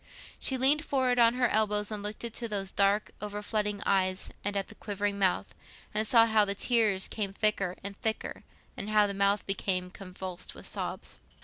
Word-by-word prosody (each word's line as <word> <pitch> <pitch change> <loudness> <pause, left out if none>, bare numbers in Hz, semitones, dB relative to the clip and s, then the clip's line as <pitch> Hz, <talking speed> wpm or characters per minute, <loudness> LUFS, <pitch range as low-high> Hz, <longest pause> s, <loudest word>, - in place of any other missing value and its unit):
She 265 - +1
leaned 280 +4 +4
forward 260 -4 +1
on 235 0 +5
her 250 -1 +3
elbows, 210 -1 +1
and 210 -1 -3
looked 210 +2 -4
into 235 0 -2
those 195 -3 -3
dark 200 +1 +2
overflooding 210 0 -2
eyes 185 -1 +1
and 205 0 -1
at 195 - -2
the - - -11
quivering 205 -1 -3
mouth, 190 -2 +1 0.4
and 215 +1 0
saw 230 0 +6
how 220 -2 +4
the 200 -1 0
tears 215 -4 +2
came 200 -3 -3
thicker 200 -3 +1
and 200 0 -5
thicker, 220 +2 -3 0.3
and 205 - -5
how 210 -1 +5
the 200 - -2
mouth 200 +1 +2
became 185 -2 -1
convulsed 185 -2 -7
with - - -10
sobs. - - -6
205 Hz, 185 wpm, -29 LUFS, 195-220 Hz, 0.4 s, saw